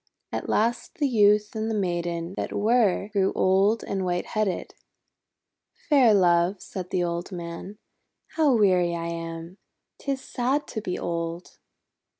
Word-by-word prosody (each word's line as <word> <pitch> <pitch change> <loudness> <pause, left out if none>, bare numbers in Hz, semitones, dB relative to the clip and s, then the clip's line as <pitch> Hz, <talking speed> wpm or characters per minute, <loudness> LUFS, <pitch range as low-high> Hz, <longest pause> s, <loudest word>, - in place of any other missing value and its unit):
At - - -4
last 230 +2 0
the 290 - +1
Youth 210 -3 +3
and 220 0 -2
the 220 - -1
Maiden 175 -2 -2
that - - -3
were, 210 -2 +2
grew 195 -2 +1
old 195 +4 +3
and 195 -1 -2
white 175 -1 -1
headed. 215 -4 -2 1.2
"Fair 270 -6 +6
Love," 175 0 +3
said 180 -1 -7
the 180 - 0
old 170 +2 -3
man, 175 +3 -7 0.5
"how 300 -5 +3
weary 180 -5 +3
I 165 0 -4
am! 165 +2 -6 0.4
'Tis 275 -1 -2
sad 265 +5 -1
to 220 - -4
be 180 -3 -3
old." 170 0 -4
190 Hz, 145 wpm, -25 LUFS, 175-220 Hz, 1.2 s, Fair